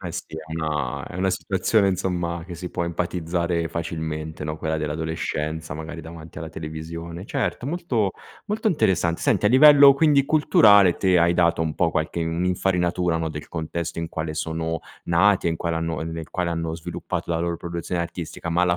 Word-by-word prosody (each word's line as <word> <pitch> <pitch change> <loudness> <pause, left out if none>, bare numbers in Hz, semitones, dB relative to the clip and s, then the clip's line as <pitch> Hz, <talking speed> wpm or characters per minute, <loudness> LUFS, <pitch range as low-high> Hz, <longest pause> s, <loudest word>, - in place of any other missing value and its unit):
Eh 90 -3 -6
sì, - - -4
è 80 0 -8
una 75 -5 -2
è - - -8
una 95 +1 +1
situazione, 95 +3 +1
insomma, 85 -2 -2
che 90 - -7
si 90 +1 -6
può 85 - -2
empatizzare 85 0 -1
facilmente, 80 -2 -4
no, 75 +1 -3
quella 80 0 -2
dell'adolescenza, 80 0 -3
magari, 80 +1 -7
davanti 80 0 -10
alla 80 +1 -6
televisione. 85 +3 -7
Certo, 120 - -2
molto 130 - 0 0.3
molto 220 +1 0
interessant 90 - +1
Senti, 105 - +2
a - - +6
livello, 140 +2 +8
quindi, 140 -1 +4
culturale 105 - +5
te 95 -2 +3
hai 85 +1 +3
dato 85 -2 +3
un 80 -1 -2
po' 85 -2 +2
qualche 80 +2 -1
un'infarinatura, 90 0 0
no, 80 0 -1
del 75 -1 -7
contesto 85 +1 -4
in 85 -1 -3
quale 80 -1 -4
sono 80 0 -2 0.3
nati 90 +1 +3
e - - +1
in 80 - -2
quale 85 0 -2
hanno 80 -1 -2
ehm, 80 +1 -4
nel 80 -1 -7
quale 90 -2 -1
hanno 80 -1 -2
sviluppato 85 0 -5
la 80 - 0
loro 85 0 -1
produzione 85 +1 -4
artistica, 85 0 -5
ma 85 +2 +2
la 90 -1 +3
85 Hz, 185 wpm, -24 LUFS, 80-90 Hz, 0.3 s, livello